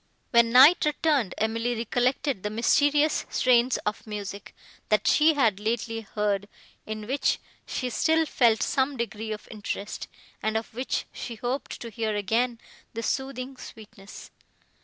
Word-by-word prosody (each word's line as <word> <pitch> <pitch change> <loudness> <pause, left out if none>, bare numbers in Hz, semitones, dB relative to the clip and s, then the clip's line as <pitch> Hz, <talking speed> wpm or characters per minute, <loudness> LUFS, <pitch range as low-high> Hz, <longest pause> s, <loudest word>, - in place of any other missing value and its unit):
When 235 -1 +5
night 270 +8 +8
returned, 295 - +1
Emily 230 +2 0
recollected 245 +1 0
the 210 - -2
mysterious 290 +7 +2
strains 250 0 +3
of 210 +1 -3
music, 205 -1 -7 0.3
that 215 -1 +2
she 310 +1 +5
had 225 -8 +2
lately 225 +1 -2
heard, 205 -1 -2 0.4
in 215 -1 -5
which 270 +5 +1 0.3
she 250 -2 -3
still 320 +5 +2
felt 235 -6 +3
some 270 +1 0
degree 220 -2 -4
of 210 - -6
interest, 205 -1 -5 0.3
and 220 0 0
of 220 - -6
which 255 +3 -2
she 235 - -6
hoped 245 +5 -4
to 235 - -7
hear 220 -1 -2
again 230 +4 0 0.4
the 230 - -3
soothing 265 +1 -3
sweetness. 215 -4 -12
230 Hz, 140 wpm, -26 LUFS, 215-260 Hz, 0.4 s, night